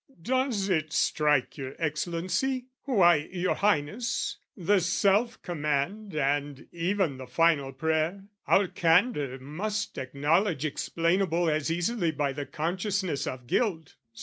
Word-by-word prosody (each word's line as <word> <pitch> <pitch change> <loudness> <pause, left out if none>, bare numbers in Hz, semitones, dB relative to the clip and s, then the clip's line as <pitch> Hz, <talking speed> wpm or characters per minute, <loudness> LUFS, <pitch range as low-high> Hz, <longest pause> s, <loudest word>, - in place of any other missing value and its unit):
Does 245 0 0
it 155 -5 0
strike 150 -2 +1
your 135 0 -6
Excellency? 175 - -1 0.2
Why, 175 - +4
your 185 0 0
Highness, 205 +4 0 0.2
The 195 +2 +3
self 195 +6 +2
command 170 +5 -2
and 145 -1 -1
even 170 -3 0
the 130 - -8
final 145 0 +2
prayer, 160 +6 -1 0.2
Our 195 0 +4
candour 165 - +2
must 185 +11 -4
acknowledge 150 +5 +1
explainable 170 +2 0
As 155 +1 0
easily 175 +2 0
by 145 -3 -1
the 140 0 -5
consciousness 180 -1 -2
of 125 -1 -5
guilt. 165 - -1
165 Hz, 120 wpm, -28 LUFS, 145-195 Hz, 0.2 s, Why